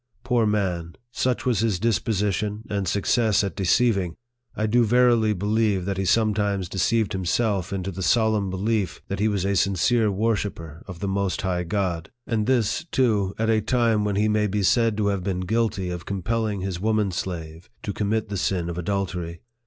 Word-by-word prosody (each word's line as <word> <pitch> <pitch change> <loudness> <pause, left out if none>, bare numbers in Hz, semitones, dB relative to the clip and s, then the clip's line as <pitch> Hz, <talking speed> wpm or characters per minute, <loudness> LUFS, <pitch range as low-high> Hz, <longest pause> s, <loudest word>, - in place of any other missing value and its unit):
Poor 120 -3 +2
man! 90 -5 -1 0.2
such 125 0 -1
was 120 -6 +2
his 110 -4 +1
disposition, 105 0 0
and 100 -2 -1
success 105 +3 +2
at 100 - -3
deceiving, 95 -2 +2 0.4
I 110 - -1
do 120 +3 +3
verily 120 -1 +4
believe 105 -1 +1
that 100 0 -2
he 95 - 0
sometimes 105 -2 +1
deceived 105 +4 0
himself 95 0 0
into 95 0 -3
the 95 +1 -6
solemn 110 -1 +2
belief, 95 - -1
that - - -3
he 105 - +2
was 100 -3 0
a 100 0 +1
sincere 100 +5 +2
wor 110 +3 +1
shipper 85 -6 -6
of 90 -2 -9
the 100 - -1
most 95 -2 -1
high 90 -2 -1
God; 85 -4 -2 0.2
and 110 -3 -1
this, 125 +2 +1
too, 110 - +1
at 115 0 +1
a 110 -1 +2
time 115 -2 +2
when 105 -1 -1
he 105 +2 +2
may 105 0 +2
be 105 0 -1
said 115 +2 +3
to 105 -1 +1
have 100 -2 -1
been 90 -1 -2
guilty 100 -2 -1
of 90 -1 -6
compelling 105 +1 -1
his 95 -2 -4
woman 110 -2 +1
slave 85 -2 -5
to 100 - -3
commit 110 +2 -1
the 100 - -3
sin 90 -2 -1
of 85 - -5
adultery. 90 -3 -3
100 Hz, 185 wpm, -24 LUFS, 95-110 Hz, 0.4 s, verily